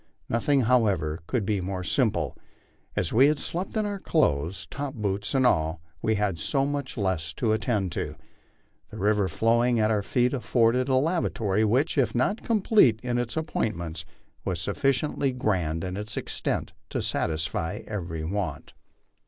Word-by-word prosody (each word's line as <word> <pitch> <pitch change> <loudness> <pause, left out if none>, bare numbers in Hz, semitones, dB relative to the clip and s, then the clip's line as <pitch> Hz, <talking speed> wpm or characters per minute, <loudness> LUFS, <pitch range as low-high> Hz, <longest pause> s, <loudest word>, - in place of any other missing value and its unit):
Nothing, 135 +4 +2
however, 100 -10 +2
could 120 -6 0
be 100 -1 0
more 90 0 -3
simple. 85 - +1 0.6
As 85 - -1
we 130 +5 +7
had 150 0 +2
slept 185 +6 -4
in 215 - +1
our 205 -1 -3
clothes, 85 - +1
top 140 0 -4
boots 100 +2 -2
and 130 -1 +4
all, 80 -6 +2 0.2
we 110 - +2
had 100 -5 0
so 135 - +1
much 140 -2 -3
less 90 -6 -1
to 110 +5 0
attend 105 -4 0
to. - - -3 0.7
The - - -9
river 105 0 +2
flowing 120 +3 +2
at 110 0 +3
our 105 -2 +2
feet 125 +5 +1
afforded 125 0 +2
a 130 - +3
lavatory 130 - +1
which, 130 +8 +2
if 120 -4 +1
not 130 - +1
complete 205 - +4
in 120 -1 0
its 120 +1 -3
appointments, 85 - -2 0.4
was 90 -4 -2
sufficiently 140 - 0
grand 90 -10 0
in 90 0 -3
its 105 +2 -5
extent - - -2 0.2
to - - -2
satisfy 80 +5 -1
every 85 -6 -4
want. 90 -4 -3
110 Hz, 160 wpm, -27 LUFS, 90-130 Hz, 0.7 s, we